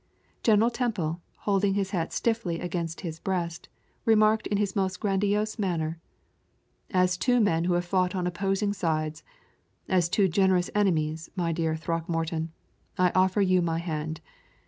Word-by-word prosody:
General 225 Hz, +1 st, +4 dB
Temple, 195 Hz, -10 st, -2 dB, 0.2 s
holding 200 Hz, -1 st, +1 dB
his 195 Hz, -1 st, -1 dB
hat 170 Hz, -4 st, -1 dB
stiffly 225 Hz, -8 st, -1 dB
against 170 Hz, -2 st, -3 dB
his 165 Hz, -2 st, -5 dB
breast, 170 Hz, -3 st, -3 dB, 0.3 s
remarked 215 Hz, -1 st, +4 dB
in 205 Hz, -, 0 dB
his 200 Hz, -2 st, -1 dB
most 190 Hz, -1 st, 0 dB
grandiose 205 Hz, +2 st, 0 dB
manner: 165 Hz, -4 st, -1 dB, 0.9 s
"As 185 Hz, -1 st, +2 dB
two 245 Hz, +5 st, +2 dB
men 170 Hz, -6 st, +2 dB
who 180 Hz, -, +2 dB
have 175 Hz, 0 st, 0 dB
fought 185 Hz, 0 st, +1 dB
on 180 Hz, -1 st, -1 dB
opposing 195 Hz, +3 st, 0 dB
sides 160 Hz, -4 st, -1 dB, 0.7 s
as 180 Hz, -2 st, +2 dB
two 195 Hz, +2 st, +3 dB
generous 185 Hz, 0 st, +2 dB
enemies, 165 Hz, -6 st, 0 dB
my 175 Hz, -3 st, 0 dB
dear 160 Hz, -1 st, 0 dB
Throckmorton 165 Hz, 0 st, -2 dB, 0.5 s
I 180 Hz, -1 st, +3 dB
offer 190 Hz, +2 st, +3 dB
you 185 Hz, -1 st, +3 dB
my 165 Hz, -1 st, 0 dB
hand. 160 Hz, -2 st, -4 dB
180 Hz, 145 wpm, -27 LUFS, 165-200 Hz, 0.9 s, General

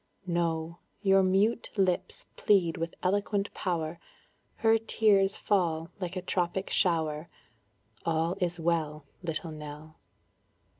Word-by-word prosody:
No; 170 Hz, -1 st, -1 dB, 0.2 s
your 195 Hz, -1 st, +5 dB
mute 195 Hz, +5 st, +2 dB
lips 185 Hz, -2 st, 0 dB
plead 180 Hz, -6 st, +3 dB
with 165 Hz, 0 st, -4 dB
eloquent 200 Hz, +2 st, 0 dB
power, 170 Hz, -3 st, -2 dB, 0.6 s
Her 225 Hz, 0 st, +4 dB
tears 205 Hz, -3 st, +3 dB
fall 170 Hz, -5 st, 0 dB
like 180 Hz, -1 st, -4 dB
a 185 Hz, -, -3 dB
tropic 185 Hz, +1 st, -1 dB
shower; 160 Hz, -3 st, +1 dB, 0.7 s
All 165 Hz, +2 st, +1 dB
is 175 Hz, -2 st, -1 dB
well, 155 Hz, -3 st, -1 dB, 0.2 s
Little 165 Hz, 0 st, -3 dB
Nell. 155 Hz, +1 st, -9 dB
175 Hz, 110 wpm, -29 LUFS, 160-195 Hz, 0.7 s, your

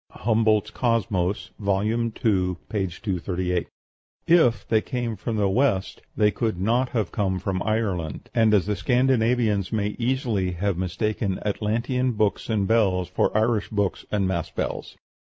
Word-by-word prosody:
(Humboldt's 110 Hz, -1 st, +1 dB
"Cosmos," 105 Hz, -6 st, 0 dB
vol. 100 Hz, -1 st, +1 dB
ii., 115 Hz, +2 st, 0 dB
238.) 90 Hz, -3 st, -1 dB, 0.6 s
If 165 Hz, -9 st, +4 dB
they 110 Hz, -1 st, +3 dB
came 120 Hz, -3 st, -3 dB
"from 110 Hz, +3 st, -4 dB
the 100 Hz, -1 st, +2 dB
West" 100 Hz, -2 st, 0 dB, 0.2 s
they 105 Hz, -1 st, +4 dB
could 110 Hz, -6 st, -2 dB
not 120 Hz, +6 st, +1 dB
have 110 Hz, -7 st, -1 dB
come 95 Hz, -2 st, 0 dB
from 95 Hz, +1 st, -2 dB
Ireland; 100 Hz, -8 st, -2 dB
and 110 Hz, -1 st, +4 dB
the 105 Hz, 0 st, +2 dB
Scandinavians 115 Hz, -2 st, +2 dB
may 105 Hz, -2 st, 0 dB
easily 115 Hz, -7 st, 0 dB
have 95 Hz, +2 st, -1 dB
mistaken 95 Hz, +2 st, -1 dB
Atlantean 115 Hz, +5 st, 0 dB
books 105 Hz, 0 st, 0 dB
and 105 Hz, -3 st, +1 dB
bells 95 Hz, -6 st, +2 dB
for 90 Hz, -, +1 dB
Irish 110 Hz, -1 st, +1 dB
books 100 Hz, -3 st, -1 dB
and 100 Hz, -3 st, +1 dB
mass 85 Hz, -4 st, -2 dB
bells. -, -, -4 dB
105 Hz, 135 wpm, -24 LUFS, 95-115 Hz, 0.6 s, If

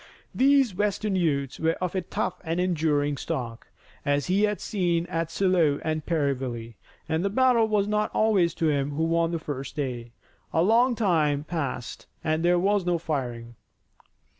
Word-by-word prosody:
These 270 Hz, -4 st, +4 dB
western 205 Hz, +1 st, -1 dB
youths 140 Hz, -7 st, 0 dB
were 160 Hz, 0 st, +2 dB
of 180 Hz, -1 st, -3 dB
a 190 Hz, -, 0 dB
tough 170 Hz, -, -3 dB
and 165 Hz, +1 st, -2 dB
enduring 150 Hz, -5 st, +1 dB
stock, 120 Hz, -4 st, -5 dB, 0.4 s
as 145 Hz, -1 st, +1 dB
he 195 Hz, +3 st, +2 dB
had 210 Hz, -1 st, -2 dB
seen 175 Hz, -5 st, 0 dB
at 165 Hz, -1 st, -2 dB
Shiloh 165 Hz, -4 st, +2 dB
and 155 Hz, -1 st, -2 dB
Perryville, 130 Hz, -8 st, -2 dB, 0.3 s
and 160 Hz, +1 st, 0 dB
the 200 Hz, -, +1 dB
battle 240 Hz, 0 st, +3 dB
was 210 Hz, -2 st, +1 dB
not 210 Hz, 0 st, 0 dB
always 195 Hz, -7 st, +2 dB
to 160 Hz, -, +1 dB
him 145 Hz, -1 st, 0 dB
who 160 Hz, +3 st, -1 dB
won 165 Hz, 0 st, +2 dB
the 170 Hz, -, -1 dB
first 140 Hz, -4 st, -6 dB
day. 125 Hz, -5 st, -4 dB, 0.4 s
A 165 Hz, -, +3 dB
long 235 Hz, +5 st, +4 dB
time 155 Hz, -9 st, +1 dB
passed 145 Hz, -6 st, -4 dB, 0.2 s
and 155 Hz, +1 st, 0 dB
there 175 Hz, +1 st, +4 dB
was 200 Hz, +2 st, +2 dB
no 175 Hz, -1 st, +1 dB
firing. 125 Hz, -7 st, -4 dB
165 Hz, 165 wpm, -26 LUFS, 145-195 Hz, 0.4 s, These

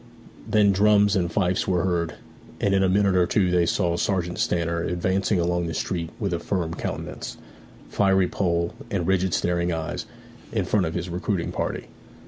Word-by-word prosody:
Then 105 Hz, -2 st, +4 dB
drums 105 Hz, +1 st, +4 dB
and 85 Hz, -3 st, 0 dB
fifes 90 Hz, -2 st, +1 dB
were 90 Hz, -3 st, +1 dB
heard, 85 Hz, -3 st, -1 dB, 0.4 s
and 100 Hz, -, +1 dB
in 95 Hz, -, +3 dB
a 95 Hz, -, +3 dB
minute 100 Hz, 0 st, +3 dB
or 90 Hz, -1 st, +4 dB
two 95 Hz, -4 st, +2 dB
they 90 Hz, -1 st, +3 dB
saw 85 Hz, -3 st, +1 dB
Sergeant 90 Hz, -2 st, -1 dB
Stanner 85 Hz, -1 st, 0 dB
advancing 95 Hz, +3 st, 0 dB
along 85 Hz, 0 st, 0 dB
the 80 Hz, -, -4 dB
street 85 Hz, -2 st, -2 dB
with 100 Hz, -5 st, -1 dB
a 85 Hz, -, -1 dB
firm 85 Hz, -4 st, -2 dB
countenance, -, -, -5 dB, 0.5 s
fiery 95 Hz, -2 st, +3 dB
poll, 85 Hz, -3 st, 0 dB, 0.2 s
and 90 Hz, -4 st, -1 dB
rigid 95 Hz, 0 st, +1 dB
staring 85 Hz, 0 st, 0 dB
eyes, 80 Hz, -1 st, -4 dB, 0.4 s
in -, -, 0 dB
front 100 Hz, -5 st, +1 dB
of 80 Hz, -, -4 dB
his 85 Hz, +1 st, -2 dB
recruiting 90 Hz, +1 st, -2 dB
party. -, -, -3 dB
90 Hz, 175 wpm, -24 LUFS, 85-95 Hz, 0.5 s, Then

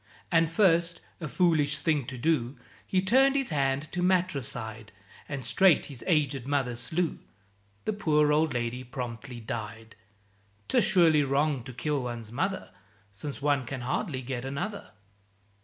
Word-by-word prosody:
And 165 Hz, -2 st, +4 dB
first, 170 Hz, -1 st, +3 dB, 0.2 s
(a 165 Hz, -, -4 dB
foolish 150 Hz, -3 st, +2 dB
thing 145 Hz, -2 st, 0 dB
to 130 Hz, -2 st, -6 dB
do), 130 Hz, -2 st, 0 dB, 0.3 s
He 185 Hz, -1 st, +1 dB
turned 265 Hz, +7 st, +4 dB
his 270 Hz, -8 st, 0 dB
hand 140 Hz, 0 st, 0 dB
to 175 Hz, -, -2 dB
matricide, 140 Hz, -, -1 dB, 0.4 s
And 140 Hz, -4 st, -4 dB
straight 190 Hz, -5 st, +4 dB
his 120 Hz, -, -9 dB
agéd 145 Hz, -7 st, +1 dB
mother 135 Hz, -4 st, 0 dB
slew, 160 Hz, +8 st, -2 dB, 0.7 s
The 215 Hz, -, 0 dB
poor 150 Hz, -7 st, +2 dB
old 155 Hz, +1 st, +2 dB
lady 120 Hz, +1 st, -2 dB
promptly 125 Hz, 0 st, -6 dB
died! 110 Hz, 0 st, -6 dB, 0.7 s
('Tis -, -, +3 dB
surely 165 Hz, -5 st, +5 dB
wrong 140 Hz, 0 st, +1 dB
to 130 Hz, -, -7 dB
kill 145 Hz, +2 st, -1 dB
one's 120 Hz, -3 st, -5 dB
mother, 190 Hz, +10 st, -2 dB, 0.4 s
Since 140 Hz, +7 st, -6 dB
one 145 Hz, -2 st, +2 dB
can 135 Hz, -1 st, -4 dB
hardly 130 Hz, +2 st, -2 dB
get 120 Hz, -1 st, -4 dB
another.) 175 Hz, +11 st, -4 dB
145 Hz, 145 wpm, -28 LUFS, 125-165 Hz, 0.7 s, surely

